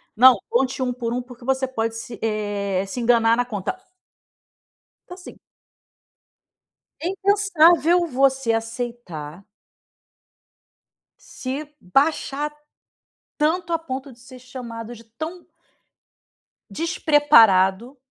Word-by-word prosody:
"Não, 255 +2 +8
conte 260 +1 0
1, 250 -1 -1
por 235 -1 -4
1, 250 - -2
porque 245 -1 -14
você 265 0 0
pode 225 -3 -3
se, 225 -1 -8
eh, 205 -3 -2
se 195 - -6
enganar 230 -1 +3
na 245 - +1
conta". 215 - -4 1.3
Assim 360 0 -11 1.6
é 335 - -2
impensável 360 -4 +3
você 265 -3 +1
aceitar 225 -8 -5 1.7
se 285 +3 -7
baixar 285 - 0 0.8
tanto 335 +3 0
a 330 - +2
ponto 270 -4 -6
de 235 - -19
ser 255 +1 -13
chamado 240 -2 -8
de 230 0 -15
tão 315 +10 -8 1.2
despreparado 260 - +3
250 Hz, 100 wpm, -22 LUFS, 225-300 Hz, 1.7 s, Não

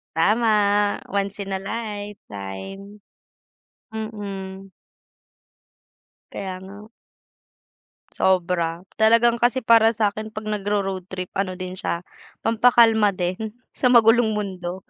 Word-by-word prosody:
Tama, 215 +8 +3 0.6
once 200 0 -2
in 195 -1 -4
a 190 - -1
lifetime. 200 - -7 0.9
Mm. 195 -3 -6 1.6
Kaya 190 -2 -5
nga. 205 +3 -12 1.2
Sobra. 175 -2 0 0.2
Talagang 230 +2 +4
kasi 245 +2 +2
para 225 -1 +5
sa'kin 215 0 -2
'pag 215 - -6
nagro-road 200 -3 -2
trip 185 -1 -6
ano 190 -1 -1
din 185 0 -7
siya, 170 - -3 0.4
pampakalma 225 -2 +4
din, 185 +4 -3 0.2
sa 250 - 0
magulong 225 -1 +5
mundo, 185 -3 -4
205 Hz, 95 wpm, -23 LUFS, 185-220 Hz, 1.6 s, para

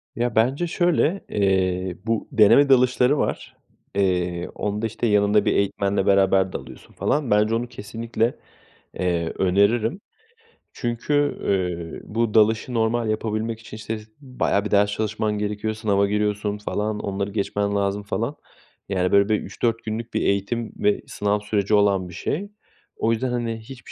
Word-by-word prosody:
Ya, 120 -1 -1
bence 130 +10 +2
şöyle. 175 +1 +1
İii, 95 -2 0
bu 115 -1 -1
deneme 135 +4 +6
dalışları 125 +1 +4
var. - - -3 0.4
İii, 90 -3 0
onda, 105 +2 -2
işte, 115 +2 -2
yanında 105 0 +3
bir - - +2
eğitmenle 100 0 0
beraber 95 -1 +3
dalıyorsun - - -9
falan. 145 -6 -1
Bence 105 +2 +3
onu 120 +2 -2
kesinlikle, 115 +1 -2 0.6
eee, 85 -2 -1
öneririm. 105 - +2 0.7
Çünkü, 120 +3 -3 0.3
ııı, 90 -4 -2
bu 115 -2 +1
dalışı 110 +3 +3
normal 115 0 +1
yapabilmek 110 +1 -2
için 110 -1 -10
işte, 110 +1 -4 0.2
bayağı 125 -7 -1
bir - - -4
ders 105 0 +4
çalışman 105 0 -1
gerekiyor, 105 +1 -2
sınava 100 -2 +1
giriyorsun, 105 0 -1
falan, 105 0 -2
onları 100 0 -3
geçmen 100 0 -1
lazım, 100 0 0
falan. 100 - -2 0.5
Yani, 90 -2 0
böyle, 100 +1 +4
bir 105 -1 +2
3-4 115 -1 -2
günlük 110 +2 -5
bir - - 0
eğitim 100 +4 -1
ve 205 -1 +1
sınav 105 0 0
süreci 105 0 -1
olan 100 -3 +3
bir - - -11
şey. 185 - -3 0.5
O 115 - 0
yüzden, 120 +3 0
hani, 120 -2 -2
hiçbir 125 +3 -12
105 Hz, 150 wpm, -23 LUFS, 100-115 Hz, 0.7 s, deneme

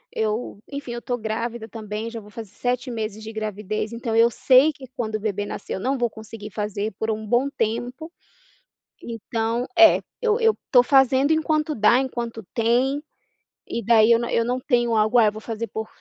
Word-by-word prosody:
eu 215 -1 -2
enfim, 280 -3 -6
eu 240 - -5
tô 245 -1 -2
grávida 225 +1 -4
também, 215 0 -6
já 230 - -6
vou 210 -1 -14
fazer 215 -2 -9
7 250 +4 -2
meses 220 -2 -4
de 220 +1 -7
gravidez, 215 0 -3
então 230 -1 -3
eu 230 +1 +6
sei 260 +5 +5
que 275 -2 -12
quando 220 -3 -3
o - - -1
bebê 205 -1 -2
nascer, 205 - -6
eu - - -3
não 265 +7 0
vou 240 -1 +1
conseguir 220 -1 -10
fazer 210 0 -3
por 220 - -1
um 220 0 -2
bom 245 +6 +2
tempo. 245 +7 -3 0.9
Então 230 +1 -2
é, 335 -1 +7 0.2
eu 460 0 +2
eu 450 -1 +3
tô 250 -3 +7
fazendo 270 +2 +4
enquanto 310 -1 +1
dá, 225 +3 +4
enquanto 235 -4 -3
tem. 255 +5 +1 0.7
E 235 - -2
daí 225 0 +5
eu 230 - +7
não 235 - -3
eu 230 - +2
não 250 +2 -1
tenho 240 -3 +1
algo: 215 +3 +4
"Ah, 225 - +6
eu - - +2
vou 215 - -9
fazer 225 0 -4
por 220 +2 -5
230 Hz, 200 wpm, -23 LUFS, 220-250 Hz, 0.9 s, é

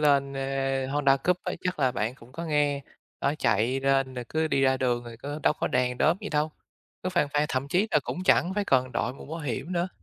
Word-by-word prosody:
lên, 140 -2 +3
ơ, 135 0 -1
Honda 140 0 +3
Cub 175 +6 +1
á 180 - -2
chắc 180 -3 -2
là 130 -3 +3
bạn 115 +1 -1
cũng 125 -1 -17
có 165 +5 -5
nghe, 145 -3 +1 0.4
đó 140 - +1
chạy 120 +2 +2
lên 135 -1 +2
rồi 125 - -4
cứ 160 0 0
đi 135 - +2
ra 130 0 +4
đường 120 -2 0
rồi 120 -1 -9
có 145 +5 -6
đâu - - +4
có - - -2
đèn 125 0 0
đóm 160 +3 +4
gì 210 - -5
đâu, 150 0 0 0.5
cứ 185 - -1
phang 175 -6 +1
phang, 150 0 +3
thậm 130 +2 -2
chí 185 +8 +2
là - - +4
cũng 180 - -4
chẳng 185 -1 +4
phải 205 0 0
cần 130 -6 +2
đội 120 - -1
mũ - - -11
bảo 160 +3 -5
hiểm 150 +4 -3
nữa. 175 +1 0
140 Hz, 250 wpm, -27 LUFS, 130-155 Hz, 0.5 s, ra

